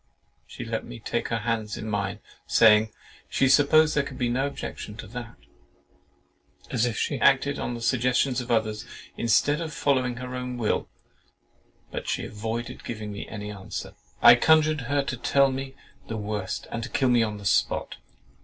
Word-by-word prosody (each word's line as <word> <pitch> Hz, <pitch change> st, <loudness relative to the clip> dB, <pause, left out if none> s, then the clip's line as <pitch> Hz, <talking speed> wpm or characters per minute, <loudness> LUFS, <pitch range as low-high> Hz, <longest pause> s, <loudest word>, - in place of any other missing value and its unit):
She -, -, -8 dB
let -, -, -3 dB
me -, -, -9 dB
take -, -, -2 dB
her 115 Hz, -, -1 dB
hands 110 Hz, -3 st, -1 dB
in 110 Hz, -, -6 dB
mine, 100 Hz, -2 st, -2 dB, 0.3 s
saying, 110 Hz, -1 st, +6 dB, 0.4 s
"She 135 Hz, -, +2 dB
supposed 150 Hz, +3 st, +5 dB
there 150 Hz, -, +3 dB
could 140 Hz, -, -7 dB
be 120 Hz, -2 st, 0 dB
no 130 Hz, +3 st, +1 dB
objection 105 Hz, -6 st, -7 dB
to -, -, -7 dB
that,"—as 115 Hz, -, -8 dB
if 115 Hz, -, -3 dB
she 140 Hz, -, -1 dB
acted 140 Hz, +1 st, +3 dB
on 120 Hz, -, -3 dB
the 115 Hz, -, -7 dB
suggestions 125 Hz, +1 st, +2 dB
of 125 Hz, -, -9 dB
others, 110 Hz, -2 st, 0 dB, 0.3 s
instead 145 Hz, +7 st, +2 dB
of 160 Hz, -2 st, -4 dB
following 130 Hz, -3 st, +1 dB
her 125 Hz, +1 st, -6 dB
own 125 Hz, -1 st, -4 dB
will—but 110 Hz, -3 st, -7 dB
still -, -, -1 dB
avoided 115 Hz, +3 st, -5 dB
giving 110 Hz, -2 st, -5 dB
me 100 Hz, -, -6 dB
any 105 Hz, -1 st, -6 dB
answer. 100 Hz, -2 st, -7 dB, 0.3 s
I -, -, +11 dB
conjured 155 Hz, +3 st, +4 dB
her 145 Hz, -1 st, +2 dB
to 130 Hz, -, -4 dB
tell 140 Hz, +3 st, +3 dB
me 135 Hz, 0 st, -5 dB, 0.3 s
the 115 Hz, -, -4 dB
worst, 105 Hz, -2 st, -4 dB
and 115 Hz, +1 st, -4 dB
kill 130 Hz, -, +2 dB
me 120 Hz, -1 st, +4 dB
on 105 Hz, -2 st, -1 dB
the 100 Hz, -, -11 dB
spot. -, -, +1 dB
120 Hz, 170 wpm, -26 LUFS, 110-135 Hz, 0.4 s, I